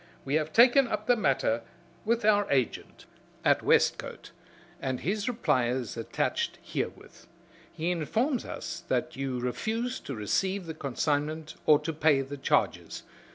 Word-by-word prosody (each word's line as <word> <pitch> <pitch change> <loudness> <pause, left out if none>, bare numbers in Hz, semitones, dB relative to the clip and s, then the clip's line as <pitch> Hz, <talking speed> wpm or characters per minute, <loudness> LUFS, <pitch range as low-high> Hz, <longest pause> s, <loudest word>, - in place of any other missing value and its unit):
We 135 - -2
have 155 0 +1
taken 245 - +6
up 215 -2 -3
the 245 - +4
matter 135 - +1 0.4
with 235 0 +1
our 205 -1 +4
agent 130 -5 -1 0.4
at - - +4
Westcote, - - +1 0.5
and 130 -1 -2
his 205 +5 -1
reply 130 - +1
is 125 -1 -2
attached 115 -1 -2
herewith. - - -6 0.4
He 165 +3 -2
informs 225 - 0
us - - -6
that - - -1
you 135 -1 -3
refused 220 - -3
to 135 - -4
receive 185 - -1
the 160 - -5
consignment 150 +2 -2
or 150 - +8
to 160 +2 -3
pay 150 -2 +3
the 140 +2 -7
charges. 135 - 0
155 Hz, 145 wpm, -28 LUFS, 135-215 Hz, 0.5 s, or